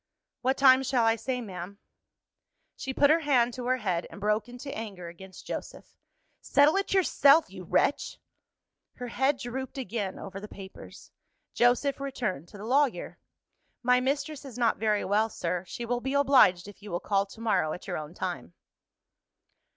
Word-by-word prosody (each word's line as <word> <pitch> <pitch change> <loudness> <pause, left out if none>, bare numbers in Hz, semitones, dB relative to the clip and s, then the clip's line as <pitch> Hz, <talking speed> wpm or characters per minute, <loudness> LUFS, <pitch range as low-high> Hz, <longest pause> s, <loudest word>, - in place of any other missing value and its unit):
"What 260 +2 +1
time 260 -1 +6
shall 260 -3 +1
I 225 0 +4
say, 250 +3 -3
ma'am?" 190 -2 -8 1.0
She 265 - -5
put 285 +2 +4
her 325 - +4
hand 250 -6 +2
to 245 0 -5
her 255 0 +2
head 185 -7 -2
and - - -11
broke 210 +2 0
into 250 +3 -8
anger 195 -6 -6
against 190 +2 -13
Joseph. - - -7 0.5
"Settle 290 +4 +4
it 395 - -1
yourself, 320 - +4
you 185 -2 -9
wretch!" 280 - 0 0.8
Her 245 -1 -6
head 265 +4 +1
drooped 260 +2 -6
again 215 -6 -3
over 195 0 -7
the 210 - -8
papers. 195 -2 -12 0.4
Joseph 245 +4 +2
returned 240 - -3
to 205 - -13
the 205 - -8
lawyer. 270 +2 0 0.6
"My 250 +1 +4
mistress 280 +3 -2
is 260 -4 -9
not 235 -2 +2
very 215 -2 0
well, 215 +3 +2
sir. 180 -2 -3
She 240 - -6
will 245 +1 -1
be 265 +2 -2
obliged 255 -11 +5
if 205 0 -13
you 210 - -10
will 175 -1 -2
call 200 +1 0
to 210 - -14
morrow, 215 -9 +1
at 180 - -7
your 180 - -3
own 155 +3 -9
time." 175 - -5
235 Hz, 175 wpm, -28 LUFS, 195-265 Hz, 1.0 s, time